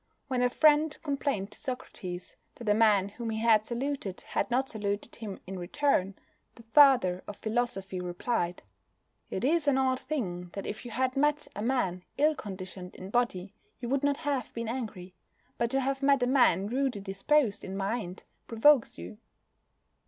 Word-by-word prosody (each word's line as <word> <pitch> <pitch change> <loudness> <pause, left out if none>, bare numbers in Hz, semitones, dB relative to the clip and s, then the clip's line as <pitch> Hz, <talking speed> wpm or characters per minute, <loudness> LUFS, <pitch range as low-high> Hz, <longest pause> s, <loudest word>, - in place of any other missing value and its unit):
When 255 -2 0
a 250 - +4
friend 305 +2 +4
complained 275 -9 -1
to - - -9
Socrates 185 -9 -6 0.2
that 235 - -10
a 210 - +5
man 210 -3 +4
whom 230 +3 -6
he 220 - -2
had 220 -1 +4
saluted 245 -5 -3
had - - -2
not 260 +2 +1
saluted 205 -1 -4
him 210 -4 -6
in 190 0 -6
return, 195 -1 +1 0.4
the 230 - -14
father 235 -8 +5
of 205 - -7
philosophy 215 -5 -2
replied: 175 0 -2 0.7
"It 190 - -2
is 315 +1 +2
an 275 -2 +4
odd 260 -1 +2
thing 180 - -4
that 195 - -5
if 215 +4 -6
you - - -6
had 255 +3 -1
met 295 +2 +1
a 205 - -4
man 200 -7 0
ill 305 +2 +4
conditioned 185 -6 -7
in 185 +1 -9
body 205 -5 0 0.3
you 240 -2 -5
would 275 +1 +1
not 285 0 +2
have 290 -4 -2
been 230 -1 -3
angry; 215 -7 -5 0.5
but 235 - +1
to 270 +2 +1
have 270 +1 -1
met 275 -2 +4
a - - +4
man 245 -8 +4
rudely 255 0 -1
disposed 205 +4 +1
in 190 +1 -5
mind 195 -2 -3 0.2
provokes 240 +3 +4
you." 210 - -9
230 Hz, 175 wpm, -29 LUFS, 195-270 Hz, 0.7 s, a